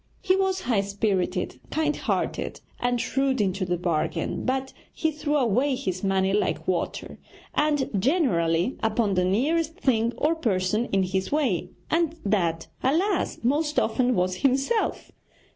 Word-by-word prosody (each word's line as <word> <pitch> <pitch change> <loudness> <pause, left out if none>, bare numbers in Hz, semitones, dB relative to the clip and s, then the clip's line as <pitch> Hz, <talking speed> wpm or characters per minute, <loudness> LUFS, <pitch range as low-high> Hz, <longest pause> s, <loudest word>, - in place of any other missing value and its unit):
He 370 -2 +3
was 385 -1 +1
high 230 -5 +1
spirited, 195 -2 -1
kind 305 -1 0
hearted, - - -2 0.2
and 245 0 0
shrewd 270 +1 0
into 195 -1 0
the 180 0 -1
bargain; 165 -1 -1
but 265 +1 -1 0.2
he 320 - 0
threw 300 0 -2
away 260 +1 +2
his 185 -9 -3
money 195 0 +2
like 210 - 0
water, - - -2 0.3
and 295 -2 +1
generally 190 - +2
upon 220 -2 +1
the 180 -1 +2
nearest 305 - +1
thing 235 - +1
or 305 +5 +2
person 215 - 0
in 195 -5 +1
his 190 +1 -2
way, 270 - 0 0.2
and 330 0 +1
that, 170 -5 +1 0.2
alas! 345 +9 +1
most 295 +5 +1
often 250 -2 +1
was 185 0 0
himself! 275 - 0
245 Hz, 145 wpm, -25 LUFS, 190-295 Hz, 0.3 s, He